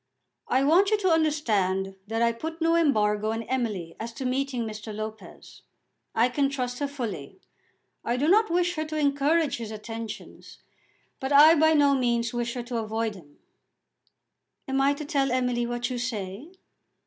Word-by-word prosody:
"I 260 +1 +2
want 350 +8 +4
you 430 - +3
to 375 -4 +1
understand 210 - +1
that 225 +2 0
I 235 - +3
put 320 +8 -6
no 330 0 +2
embargo 215 -9 +2
on 225 0 -3
Emily 215 -10 -3
as 230 +1 -5
to 260 - -6
meeting 255 -2 -1
Mr. 215 0 -7
Lopez. 215 +1 -8 0.5
I 230 +2 +4
can 275 +2 0
trust 250 -3 -3
her 285 - -1
fully. 240 - -6 0.6
I 240 +1 -1
do 285 +4 +1
not 430 +5 +4
wish 350 +1 +1
her 310 - -1
to 310 0 -4
encourage 290 +2 +2
his 230 -2 -6
attentions, 225 +1 -8 0.6
but 265 +1 -4
I 295 +3 +8
by 315 0 +4
no 285 -1 +4
means 235 -3 0
wish 240 0 -2
her 245 - -3
to 240 0 -4
avoid 220 0 -2
him." 150 -7 -16 1.3
"Am 270 0 0
I 280 +1 +3
to 300 - -6
tell 280 -4 0
Emily 250 -1 0
what 240 +1 -3
you 245 - -3
say?" 220 - -5
250 Hz, 170 wpm, -26 LUFS, 225-290 Hz, 1.3 s, I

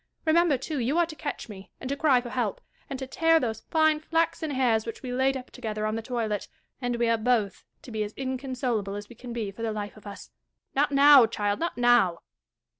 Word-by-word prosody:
Remember, 325 -2 +4
too, 285 +3 -4
you 255 +7 0
are 345 - +4
to 320 -1 -9
catch 295 - -5
me, 195 -3 -11
and - - -6
to 280 - 0
cry 280 -4 +3
for 240 -1 -8
help, 235 -6 -1 0.3
and 270 - -4
to 265 - -5
tear 325 +5 +3
those 225 -5 -3
fine 315 -1 +3
flaxen 325 0 0
hairs 250 -5 +2
which 230 +3 -7
we 250 -1 -4
laid 265 +1 +2
up 255 - -10
together 215 -4 -4
on 215 0 -1
the 225 - -3
toilet; 225 -4 -2 0.3
and 245 -1 -1
we 235 0 +1
are 230 -1 +2
both 220 -5 0 0.2
to 250 - -10
be 220 -1 -3
as 210 0 -2
inconsolable 255 -6 -3
as 205 0 -7
we 240 - -12
can 245 +1 -9
be 225 -4 -3
for 210 - -11
the 225 -1 -1
life 205 -1 -5
of 215 -1 -13
us. 200 - -10 0.4
Not 290 +2 +2
now, 280 -3 +8
child, 205 -2 -1
not 335 -5 -2
now. 240 -8 +3
245 Hz, 230 wpm, -27 LUFS, 220-275 Hz, 0.4 s, now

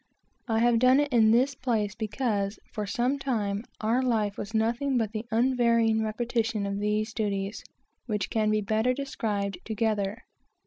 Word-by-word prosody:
I 225 -2 +1
have 235 -1 +4
done 255 +3 +5
it 290 -2 0
in 225 -2 +5
this 250 +5 +3
place 225 -6 -1
because, 215 -2 -2 0.2
for 210 -2 -3
some 250 +7 0
time, 210 -7 -1 0.2
our 225 +4 +2
life 220 -5 0
was 205 - -6
nothing 235 +5 +1
but 220 -3 0
the 220 +1 -4
unvarying 230 -2 +2
repetition 225 -1 -1
of 200 0 -2
these 210 +2 -1
duties, 200 -2 -2 0.4
which 210 -4 -2
can 215 -1 +1
be 215 0 +2
better 220 +5 +1
described 205 -8 -3
together. 215 -1 -1
220 Hz, 160 wpm, -27 LUFS, 210-240 Hz, 0.4 s, done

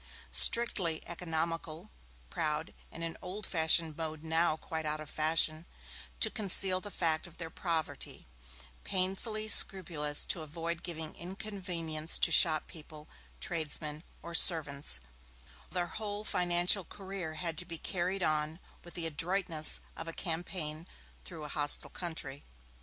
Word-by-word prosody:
Strictly 190 -9 +3
economical, 165 +1 -4 0.4
proud 155 +2 -2 0.2
in 165 - -7
an 165 0 -4
old 190 +3 -4
fashioned 160 -2 +2
mode 155 -1 -5
now 160 0 +1
quite 160 0 -5
out 155 0 -1
of 155 -1 -9
fashion 155 +1 +1 0.5
to - - +5
conceal 190 -3 +3
the 205 - -7
fact 165 -3 0
of 170 - -17
their 165 -2 -6
poverty, 165 -3 -3 0.6
painfully 195 +4 -1
scrupulous 160 -8 +4
to 170 - -2
avoid 165 +2 -5
giving 160 -3 -5
inconvenience 175 -4 -1
to - - +4
shop 155 -3 +5
people, 155 -1 -12 0.3
tradesmen 155 -2 -4 0.2
or 170 - -7
servants, 145 - +3 0.7
their 180 -1 -1
whole 205 +3 -5
financial 180 0 +3
career 190 -3 -7
had 165 0 -1
to 180 - -4
be 170 -1 -6
carried 185 +2 -2
on 155 0 0 0.3
with 175 - -12
the 170 - -3
adroitness 165 0 +5
of 165 - -7
a 165 - -5
campaign 165 -2 -3 0.4
through 160 -3 -8
a - - -5
hostile 145 0 +1
country. 160 -5 -6
165 Hz, 135 wpm, -32 LUFS, 155-180 Hz, 0.7 s, to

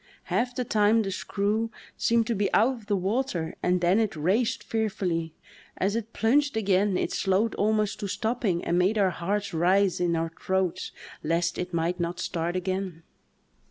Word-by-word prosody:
Half 245 +1 +1
the 250 - -1
time 215 +1 +3
the 195 - -3
screw 210 +4 -1 0.3
seemed 230 -1 +2
to 235 - 0
be 205 -2 0
out 230 -1 +2
of 200 -3 +1
water 195 -6 -1
and 180 0 +1
then 180 +4 +4
it 220 -5 0
"raced" 190 +10 +1
fearfully; 180 -7 -2 0.4
as 200 +3 0
it 230 -1 -3
plunged 275 +4 +2
again 200 -2 +2
it - - -1
slowed 195 +4 +1
almost 215 0 +1
to 205 - -3
stopping 220 -3 -1
and 175 +1 +2
made 195 +5 +2
our 195 -3 +3
hearts 200 +3 -2
rise 185 +3 +3
in 175 -1 +1
our 165 0 -1
throats 185 -1 -1 0.3
lest 170 +2 0
it 180 0 -3
might 170 +1 -1
not 170 +1 -2
start 175 -1 -2
again. 185 -2 -3
195 Hz, 170 wpm, -27 LUFS, 175-220 Hz, 0.4 s, then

